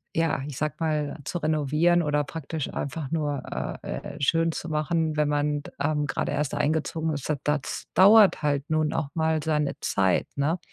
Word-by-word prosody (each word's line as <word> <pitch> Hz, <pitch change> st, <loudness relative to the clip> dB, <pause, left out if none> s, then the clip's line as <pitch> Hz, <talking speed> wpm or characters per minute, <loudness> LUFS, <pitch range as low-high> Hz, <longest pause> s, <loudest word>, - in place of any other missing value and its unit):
ja 165 Hz, -4 st, +1 dB
ich 140 Hz, -, -7 dB
sage 150 Hz, 0 st, -1 dB
mal 155 Hz, -2 st, -1 dB
zu 175 Hz, -, -3 dB
renovieren 155 Hz, +3 st, +2 dB
oder 150 Hz, 0 st, +1 dB
praktisch 155 Hz, 0 st, -5 dB
einfach 140 Hz, 0 st, -4 dB
nur, 145 Hz, -4 st, -1 dB, 0.4 s
äh, -, -, -4 dB, 0.2 s
äh, -, -, -10 dB
schön 165 Hz, +4 st, +2 dB
zu 160 Hz, -, -5 dB
machen, 155 Hz, 0 st, 0 dB
wenn 150 Hz, -, +2 dB
man 145 Hz, 0 st, 0 dB
d -, -, -10 dB
ähm, 150 Hz, 0 st, 0 dB
gerade 130 Hz, -, -2 dB
erst 145 Hz, -1 st, -1 dB
eingezogen 160 Hz, +1 st, 0 dB
ist, 140 Hz, -, -4 dB
da 145 Hz, -, 0 dB
das 150 Hz, -2 st, -2 dB
dauert 200 Hz, 0 st, +7 dB
halt 145 Hz, +1 st, 0 dB
nun 155 Hz, -1 st, +1 dB
auch 155 Hz, -4 st, -2 dB
mal 160 Hz, -1 st, +1 dB
seine 150 Hz, -1 st, 0 dB
Zeit, 95 Hz, -2 st, +1 dB
ne? 155 Hz, +5 st, 0 dB
150 Hz, 185 wpm, -26 LUFS, 145-160 Hz, 0.4 s, dauert